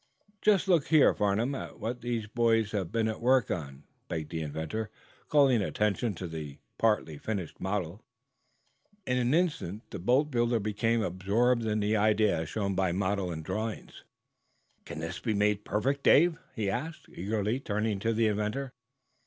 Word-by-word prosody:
'" 205 -1 -36
"Just 205 -2 +3
look 170 -6 +3
here, 155 -2 +6
Farnum, 105 +6 0
at 135 - -7
what 120 +2 -4
these 120 -2 -2
boys 115 -1 +2
have 95 -5 -2
been 115 -1 +1
at 110 +1 -4
work 125 -1 +3
on," 70 -4 -5 0.2
begged 80 -2 -4
the 80 -1 -3
inventor, 80 +9 -4 0.4
calling 135 -6 +5
attention 105 +1 0
to 90 +1 -5
the 75 -4 -7 0.2
partly 105 -9 +1
finished 100 -5 -4
model. 95 0 -2 1.0
In 125 0 +1
an 125 +4 +2
instant 150 - -1
the - - -5
boatbuilder 120 - +2
became 110 +2 0
absorbed 110 +6 +1
in 105 0 0
the 105 +2 +1
idea 105 -4 +3
as 80 -1 -4
shown 100 -3 -1
by 95 -1 +1
model 95 0 -1
and 80 -1 -6
drawings. 110 0 -4 0.8
"Can - - -7
this 80 +2 -4
be 110 -3 -1
made 105 0 +1
perfect, 135 +7 0
Dave?" 165 +4 +5 0.2
he 105 -2 -1
asked, 140 +11 -4
eagerly, 105 +5 -2
turning 105 -4 -1
to 115 +3 0
the 115 0 +2
inventor. 105 +5 -1
110 Hz, 165 wpm, -29 LUFS, 95-120 Hz, 1.0 s, here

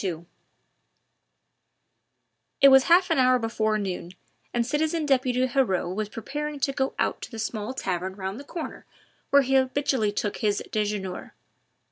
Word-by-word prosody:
II 170 -3 -3 2.3
It 275 - +8
was 265 -1 +7
half 360 +1 +4
an 325 - +3
hour 255 0 +5
before 220 -2 0
noon, 185 -3 -4 0.4
and 240 -1 0
citizen 310 +4 0
deputy 255 -2 +2
Heriot 235 -9 0
was 210 +1 -3
preparing 295 +7 -5
to 275 0 +1
go 265 0 -1
out - - -1
to - - -7
the 225 - -9
small 220 +2 -4
tavern 190 -4 -3
round 195 +3 -5
the - - -8
corner 325 +3 -7 0.4
where 280 0 +5
he 265 +1 -1
habitually 265 -4 +2
took 205 0 -2
his 205 -1 0
dejeuner. 205 -3 -3
245 Hz, 150 wpm, -26 LUFS, 205-275 Hz, 2.3 s, It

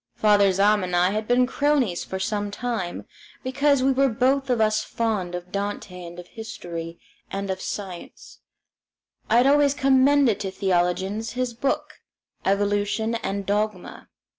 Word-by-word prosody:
Father 205 -2 +4
Zahm 200 +2 +3
and 180 -1 -2
I 180 +2 +3
had 215 +1 -2
been 245 +1 +4
cronies 265 -8 +1
for 190 - -5
some 205 +2 -2
time, 205 -4 -4 0.4
because 275 +1 +2
we 270 - +4
were 270 +1 +3
both 265 +4 +1
of 245 -2 +2
us 215 0 +2
fond 210 -7 -2
of 180 0 -7
Dante 200 -2 -4
and 170 0 -9
of 175 - -9
history 170 -7 -7 0.3
and 195 0 -3
of 190 0 -4
science 185 -4 -7 0.9
I 225 - +4
had 245 - +5
always 285 0 +4
commended 270 -4 +4
to 200 -2 -3
theologians 190 +3 -1
his 250 -1 -2
book, 270 +4 -2 0.4
"Evolution 205 +3 0
and 200 -3 -3
Dogma." 205 -2 -2
210 Hz, 150 wpm, -24 LUFS, 190-250 Hz, 0.9 s, had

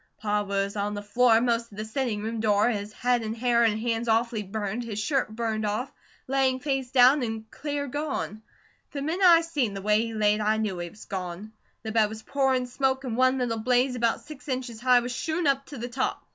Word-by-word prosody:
Pa 210 -1 0
was 200 0 -2
on 205 0 -2
the 205 - -5
floor, 225 +2 +4
most 235 -1 0
to 205 - -14
the 215 +1 -4
sitting 220 -2 -2
room 225 +1 -3
door, 210 +1 +3
his 205 -1 -4
head 245 +2 +1
and 220 +1 -4
hair 240 0 +2
and 220 -2 +2
hands 230 0 -1
awfully 225 0 +1
burned, 210 +3 -4
his 225 -3 -6
shirt 270 +5 0
burned 220 -1 -2
off, 215 +5 -2 0.3
laying 260 -1 +1
face 270 -2 -2
down, 260 +2 +6
and 220 -2 -4
clear 290 -1 -3
gone. 285 -6 -4 0.5
The 280 -1 -3
minute 335 +6 -1
I 335 -1 +8
seen 290 -11 -1
the 195 - -5
way 210 +1 +3
he 230 -1 -4
laid, 210 0 +2
I 215 +1 +2
knew 210 -5 -2
he 175 0 -4
was 210 - -14
gone. 185 +2 -6 0.3
The 220 - -4
bed 220 -1 +3
was 220 0 -8
pourin' 265 -2 +1
smoke 265 +1 -1
and 245 -4 -3
one 255 +1 +3
little 240 -3 -1
blaze 250 +3 +2
about 235 -2 0
six 300 0 -12
inches 255 -4 -4
high 250 -1 +5
was 245 +1 -4
shootin' 320 +6 -2
up 275 -1 +1
to 285 - -8
the 240 +1 -4
top. 255 +2 -2
235 Hz, 225 wpm, -26 LUFS, 215-260 Hz, 0.5 s, I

